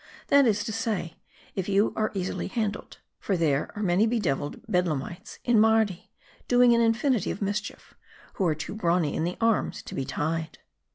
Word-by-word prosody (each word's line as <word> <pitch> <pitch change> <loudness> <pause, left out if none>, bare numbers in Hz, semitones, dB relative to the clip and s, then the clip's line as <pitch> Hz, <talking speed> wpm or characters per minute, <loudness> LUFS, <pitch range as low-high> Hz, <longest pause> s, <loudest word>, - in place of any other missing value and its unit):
That 280 -2 +6
is 205 -2 +1
to 220 - -4
say, 215 -7 -3 0.3
if 190 0 -3
you 200 +2 +3 0.2
be 195 - -3
easily 185 - -3
handled. 210 -1 -3 0.2
For 195 - -1
there 150 -4 +1
are 210 - -3
many 190 +4 +3
bedevil 160 - -1
ed - - -17
Bedlamites 180 0 -2
in 240 -3 +3
Mardi, 220 -4 +2 0.4
doing 245 -1 +5
an 235 - +3
infinity 230 -1 +2
of - - -4
mischief, 205 +1 -4 0.4
who 190 - 0
are 155 - +1
too 155 +4 -6
brawny 175 -7 +1
in 160 - 0
the 175 - -3
arms 225 -1 +1
to - - -9
be 135 - -2
tied." 160 +3 -3
200 Hz, 180 wpm, -27 LUFS, 170-225 Hz, 0.4 s, That